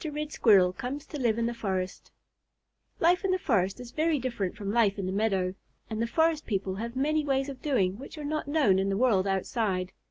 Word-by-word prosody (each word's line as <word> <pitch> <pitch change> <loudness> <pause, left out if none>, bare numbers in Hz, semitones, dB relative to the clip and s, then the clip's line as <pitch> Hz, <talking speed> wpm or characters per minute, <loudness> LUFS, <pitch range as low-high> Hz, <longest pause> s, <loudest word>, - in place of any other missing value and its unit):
RED 300 -1 -4
SQUIRREL 190 -8 +5
COMES 270 +6 -5
TO 295 - -7
LIVE 230 -4 +1
IN 230 - 0
THE 235 - -1
FOREST 190 -5 -4 0.9
Life 350 +3 +3
in 390 - 0
the 370 - +3
forest 200 - 0
is 245 -1 -9
very 315 +1 +1
different 235 -8 -3
from 200 -1 -4
life 215 -4 +3
in 195 - -3
the 185 - -2
meadow, 195 -3 0 0.4
and 220 0 -2
the 230 - +1
forest 320 +4 +1
people 195 -3 -1
have 235 +3 -5
many 300 +3 +1
ways 270 -1 0
of 270 -2 -8
doing 200 -9 0
which 275 - -10
are 300 - -6
not 305 0 -2
known 285 -11 +3
in 195 +1 0
the 195 - 0
world 210 -6 +3
outside. 190 -1 -1
235 Hz, 220 wpm, -28 LUFS, 195-290 Hz, 0.9 s, SQUIRREL